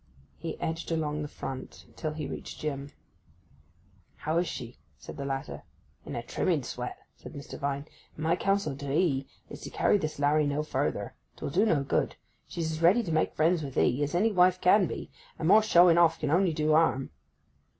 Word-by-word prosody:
He -, -, -5 dB
edged 165 Hz, +1 st, -3 dB
along 155 Hz, -2 st, -1 dB
the 150 Hz, -, -3 dB
front 130 Hz, -2 st, -7 dB
till 155 Hz, -2 st, -3 dB
he 150 Hz, -1 st, -4 dB
reached -, -, -7 dB
Jim. 140 Hz, -2 st, -4 dB, 1.2 s
'How 160 Hz, +2 st, -1 dB
is 175 Hz, -, 0 dB
she?' 120 Hz, 0 st, -7 dB, 0.2 s
said -, -, -10 dB
the 140 Hz, -1 st, -5 dB
latter. 135 Hz, +1 st, -4 dB, 0.5 s
'In -, -, -5 dB
a -, -, -3 dB
trimming -, -, 0 dB
sweat,' -, -, -5 dB, 0.2 s
said -, -, -11 dB
Mr. 140 Hz, -, -8 dB
Vine. 140 Hz, 0 st, -2 dB, 0.3 s
'And 155 Hz, -, -6 dB
my 165 Hz, +2 st, +3 dB
counsel 195 Hz, -5 st, 0 dB
to 140 Hz, -1 st, -5 dB
'ee 140 Hz, -4 st, +1 dB, 0.2 s
is -, -, -9 dB
to -, -, -7 dB
carry 205 Hz, -, +2 dB
this 155 Hz, -4 st, -3 dB
larry 145 Hz, +1 st, +3 dB
no 145 Hz, +1 st, -1 dB
further. 155 Hz, -, -2 dB, 0.2 s
'Twill -, -, -5 dB
do 195 Hz, +8 st, +3 dB
no 150 Hz, -9 st, +2 dB
good. 135 Hz, -, 0 dB, 0.3 s
She's 165 Hz, -2 st, -3 dB
as 160 Hz, +1 st, -5 dB
ready 190 Hz, +8 st, +5 dB
to 175 Hz, -, -4 dB
make 155 Hz, 0 st, +1 dB
friends 165 Hz, +2 st, +2 dB
with 135 Hz, -3 st, -6 dB
'ee 125 Hz, +4 st, +2 dB
as 145 Hz, +3 st, -1 dB
any 215 Hz, +6 st, +3 dB
wife 185 Hz, -1 st, +4 dB
can 185 Hz, +1 st, +5 dB
be; -, -, -6 dB, 0.3 s
and 160 Hz, -, -2 dB
more 215 Hz, +4 st, +7 dB
showing 175 Hz, -5 st, +6 dB
off 165 Hz, -1 st, +4 dB
can 150 Hz, -2 st, -1 dB
only 180 Hz, +2 st, +3 dB
do 155 Hz, 0 st, +1 dB
harm. 135 Hz, -, +2 dB
155 Hz, 200 wpm, -29 LUFS, 140-175 Hz, 1.2 s, more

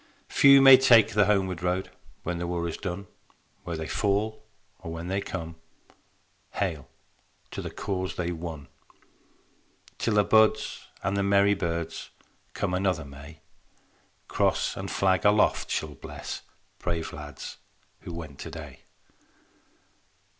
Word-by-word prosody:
Few 140 Hz, -1 st, +7 dB
may 135 Hz, -1 st, +11 dB
take 115 Hz, -5 st, +6 dB
the 105 Hz, -1 st, +4 dB
homeward 95 Hz, -4 st, +1 dB
road 90 Hz, +1 st, -1 dB, 0.3 s
When 85 Hz, 0 st, -3 dB
the 85 Hz, -, -3 dB
war 85 Hz, -1 st, -2 dB
is 80 Hz, -, -4 dB
done: 100 Hz, 0 st, -5 dB, 0.6 s
Where 85 Hz, -2 st, -3 dB
they 80 Hz, -, -4 dB
fall 105 Hz, +2 st, 0 dB, 0.4 s
or 85 Hz, -3 st, -7 dB
when 85 Hz, +2 st, -5 dB
they 95 Hz, +1 st, 0 dB
come, 80 Hz, -3 st, -6 dB, 1.0 s
Hail, 80 Hz, -9 st, -2 dB, 0.6 s
to -, -, -5 dB
the -, -, -5 dB
cause 95 Hz, -2 st, -3 dB
they 85 Hz, -1 st, -2 dB
won. 80 Hz, -4 st, -6 dB, 1.3 s
Till 115 Hz, -, 0 dB
the 105 Hz, -, +5 dB
buds 110 Hz, +1 st, +2 dB, 0.2 s
and 95 Hz, -, 0 dB
the 100 Hz, -, +1 dB
merry 100 Hz, +1 st, +4 dB
birds 85 Hz, -4 st, -3 dB, 0.5 s
Come 95 Hz, -3 st, -1 dB
another 90 Hz, -4 st, 0 dB
May, 70 Hz, +3 st, -12 dB, 0.9 s
Cross -, -, +1 dB
and -, -, -5 dB
Flag 95 Hz, -1 st, +2 dB
aloft 105 Hz, +1 st, +3 dB
shall 75 Hz, -1 st, -2 dB
bless -, -, -7 dB, 0.4 s
Brave 85 Hz, -2 st, -3 dB
lads 75 Hz, -1 st, -8 dB, 0.4 s
who -, -, -9 dB
went 80 Hz, -5 st, -8 dB
today. -, -, -8 dB
90 Hz, 130 wpm, -27 LUFS, 85-100 Hz, 1.3 s, may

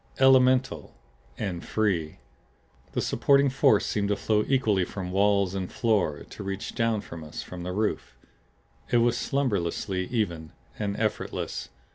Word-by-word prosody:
ELEMENTAL 130 Hz, 0 st, +4 dB, 0.4 s
and 90 Hz, -4 st, -3 dB
free. 95 Hz, -8 st, -1 dB, 0.8 s
The -, -, 0 dB
supporting 140 Hz, -1 st, +3 dB
force 110 Hz, -5 st, +4 dB
seemed 100 Hz, -1 st, -1 dB
to 105 Hz, -, +2 dB
flow 105 Hz, +1 st, +1 dB
equally 110 Hz, -8 st, +2 dB
from 90 Hz, 0 st, -5 dB
walls 100 Hz, -1 st, +2 dB
and 95 Hz, -2 st, -4 dB
floor; 105 Hz, -10 st, 0 dB
to -, -, -9 dB
reach 100 Hz, +2 st, -4 dB
down 115 Hz, -3 st, 0 dB
to 85 Hz, -1 st, -9 dB
us 75 Hz, -, -7 dB
from 90 Hz, -1 st, -8 dB
the 90 Hz, +1 st, -4 dB
roof. 105 Hz, -, -2 dB, 0.7 s
It 120 Hz, -, +3 dB
was 120 Hz, 0 st, +3 dB
slumberously 100 Hz, -8 st, -1 dB
even, 85 Hz, -9 st, -2 dB, 0.3 s
and 100 Hz, -2 st, -2 dB
effortless. 110 Hz, -1 st, -3 dB
105 Hz, 140 wpm, -27 LUFS, 90-115 Hz, 0.8 s, ELEMENTAL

